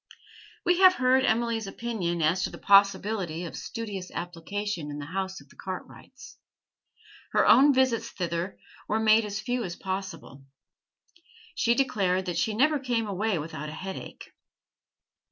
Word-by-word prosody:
We 355 0 +3
have 370 -1 +7
heard 260 -1 +3
Emily's 225 -1 0
opinion 195 -6 -2
as 170 +5 +2
to - - 0
the - - -10
possibility 195 -3 +3
of 165 - -7
studious 205 -6 -6
application 175 0 -4
in 145 - -6
the 145 - -6
house 190 +3 -4
of - - -18
the - - -19
Cartwrights. - - -9 0.9
Her - - +4
own 285 +2 +7
visits 260 -3 +1
thither 175 +1 -3 0.3
were 215 - 0
made 220 0 +4
as 205 0 -4
few 245 -1 -2
as 175 -4 -5
possible; 185 -8 -6 1.1
she 235 0 +2
declared 195 -9 +1
that 175 -2 -3
she 215 - 0
never 295 +5 +3
came 240 -4 -1
away 205 0 -1
without 155 -1 -5
a - - -8
headache. 190 +3 -8
200 Hz, 150 wpm, -27 LUFS, 175-230 Hz, 1.1 s, have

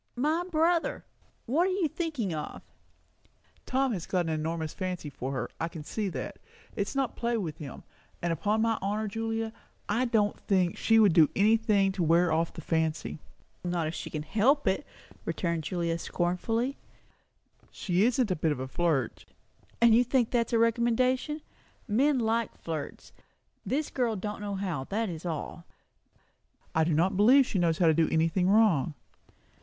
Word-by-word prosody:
My 305 +7 +1
brother? 330 +1 +1 0.4
What 320 +10 +2
are - - 0
you 370 -3 +1
thinking 300 - -3
of?" 155 - -6 1.0
"Tom 265 -1 +1
has 175 -5 -5
got 180 -2 0
an 165 - -2
enormous 160 0 -2
fancy 180 -5 -4
for 130 0 -5
her; 135 - -2
I 165 - -1
can 165 -2 -8
see 205 +6 -3
that. - - -6 0.4
It's 200 +6 -2
not 270 -4 0
play 235 0 -1
with 160 -7 -4
him. 145 -4 -8 0.4
And 170 -1 0
upon 210 +7 0
my 225 -1 +1
honour, 210 +2 -1
Julia, 225 +1 -3 0.3
I 230 +5 +1
do 225 -4 +3
not 205 - -3
think 185 -3 +1
she 225 - +3
would 210 -5 +6
do 160 -3 +6
any 210 +3 +5
thing 210 -4 +2
to 190 - -3
wear 170 +1 +3
off 165 +1 +1
the - - -9
fancy." 160 0 -1 0.4
"Not 175 -2 -1
if 155 - -3
she - - -6
could 150 -1 -5
help 240 - +2
it!" 195 +10 0 0.4
returned 170 -3 -2
Julia 170 -2 -1
scornfully. 225 +11 -1 0.9
"She 180 0 0
isn't 240 -2 +2
a - - +2
bit 160 -1 0
of 145 - -2
a 130 - -4
flirt." 150 -4 -1 0.6
"You 235 +1 +6
think 245 -1 +1
that 235 -2 +2
is - - -8
a - - +5
recommendation? 250 +6 +1 0.5
Men 265 +7 +3
like 230 -1 0
flirts. 155 -3 -6 0.5
This 295 +3 -2
girl 240 -4 0
don't 210 +1 -5
know 205 -1 -3
how, 180 -9 -3
that 215 +4 -2
is 170 0 -6
all." 165 +1 -5 1.1
"I 160 - +3
do 165 - +1
not 175 +5 +2
believe 250 +8 +6
she 200 - -1
knows 165 -2 +2
how 175 - +3
to 160 - +5
do 160 +1 +2
anything 165 +3 +2
wrong." 195 - +3
200 Hz, 175 wpm, -29 LUFS, 165-235 Hz, 1.1 s, would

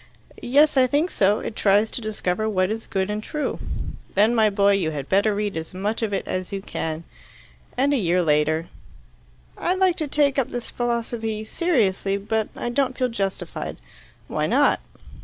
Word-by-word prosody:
"Yes, 285 +4 +4
I 255 -1 +6
think 295 +7 +1
so. 200 +1 +2
It 215 - -5
tries 205 +2 +3
to - - -4
discover 215 -1 -1
what 185 -1 +1
is 225 +1 -4
good 190 +1 -1
and 210 0 -2
true." 300 +7 -3 0.6
"Then, 210 +4 +4
my 220 -2 +4
boy, 200 0 +3
you 195 -5 +1
had 145 -3 -5
better 200 +2 +2
read 205 -2 -2
as 160 +2 -6
much 205 +5 -2
of 220 -2 -1
it 195 - -2
as 185 -1 -3
you 195 - -2
can." 160 -4 -4 0.7
And 275 +3 +3
a - - +3
year 180 -4 +2
later: 155 +1 +1 0.9
"I'd 360 +2 0
like 370 -2 +3
to 310 - +1
take 280 -1 +2
up 260 - 0
this 245 -1 -5
philosophy 230 -2 -2
seriously, 210 - +1
but 215 +2 -1
I - - -3
don't 260 0 0
feel 255 -1 +1
justified." 195 -4 -3 0.5
"Why - - -1
not?" - - +3
215 Hz, 180 wpm, -23 LUFS, 195-245 Hz, 0.9 s, I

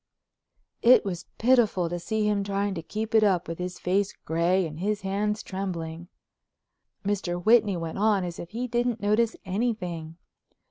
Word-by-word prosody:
It 245 -1 +6
was 180 -4 -4
pitiful 225 -7 +3
to 175 +1 -3
see 215 +4 -1
him 205 -1 +1
trying 200 0 -1
to 170 - -4
keep 215 +7 -5
it 220 -1 +6
up 185 -4 +2
with 165 +1 -5
his 180 0 -4
face 195 +2 0
gray 170 +3 +2
and 155 -1 -7
his 205 +2 -1
hands 205 +2 -1
trembling. 170 -4 -5 1.0
Mr. 185 -3 -1
Whitney 210 -1 +4
went 165 +1 -4
on 210 -2 +3
as 175 -1 -5
if 170 - -7
he 240 +5 -3
didn't 240 -1 0
notice 215 +2 +2
anything. 180 -6 -3
195 Hz, 165 wpm, -27 LUFS, 175-215 Hz, 1.0 s, It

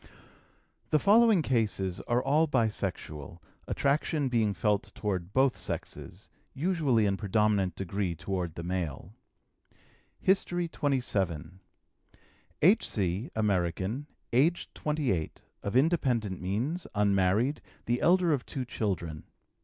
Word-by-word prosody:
The 155 - +4
following 210 0 +5
cases 105 -8 0
are 120 +1 +1
all 150 +4 +3
bisexual, 105 - -2 0.3
attraction 145 0 0
being 110 -4 +1
felt 105 0 0
toward 95 -4 -3
both 130 +2 +3
sexes, - - -5 0.3
usually 145 - +2
in 100 -1 +1
predominant 105 -2 +1
degree 95 -1 -2
toward 90 -1 -3
the 85 - -6
male: 85 0 -4 1.1
HISTORY 175 -2 +1
XXVII. 95 - -1 1.0
H.C., 110 - +2
American, 100 - 0 0.3
aged 155 +8 +2
28, 140 - -2 0.2
of 100 - -4
independent 125 - +1
means, 120 - -2
unmarried, 105 +6 +2 0.2
the 120 +1 0
elder 175 -1 +4
of 135 -4 -1
two 130 -2 -5
children. 85 - -3
110 Hz, 105 wpm, -29 LUFS, 95-145 Hz, 1.1 s, following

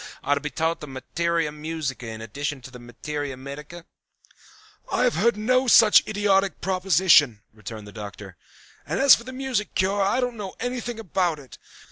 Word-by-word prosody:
's - - -10 0.2
are 145 - +2
to 140 - -1
be 150 - -3
taught 165 +2 -1
the 150 - -8
materia 165 +4 -2
musica 150 -5 -5
in 110 0 -7
addition 145 +6 -4
to 130 0 -12
the 125 - -11
materia 135 +3 -6
medica?" 150 +6 -9 1.1
"I - - +1
had 250 - +3
heard 230 +8 +2
of - - -9
no 255 +4 +2
such 225 -2 +7
idiotic 200 -2 +1
proposition," 180 - +3
returned 110 0 -9
the 105 - -11
Doctor. 100 -2 -9 0.5
"And 160 +6 -3
as 275 -1 +8
for 235 - +2
the 260 - -7
music 255 -5 -3
cure 195 +2 +1
I 195 +6 +1
don't 245 -2 -2
know 200 -3 -7
anything 245 -1 -4
about 180 -5 -1
it. 135 -3 -14
165 Hz, 185 wpm, -24 LUFS, 135-210 Hz, 1.1 s, as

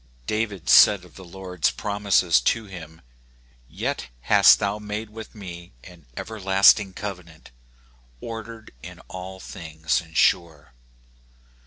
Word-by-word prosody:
David 105 - -3
said 100 -3 +6
of 90 - -19
the 95 - -11
Lord's 90 -1 -2
promises 100 -4 +1
to 115 -1 0
him, 80 -5 -11 0.4
" - - -33 0.2
Yet - - -4
hast - - +6
thou 100 +1 -2
made 105 +1 -6
with 110 +1 -10
me 85 - -10
an 85 -6 -16
everlasting 95 -1 +3
covenant, 90 -8 -9 0.7
ordered 115 - -9
in - - -11
all 95 +1 -8
things 80 -5 -3
and 80 -2 -10
sure." 80 -7 +1
95 Hz, 125 wpm, -23 LUFS, 85-105 Hz, 0.7 s, said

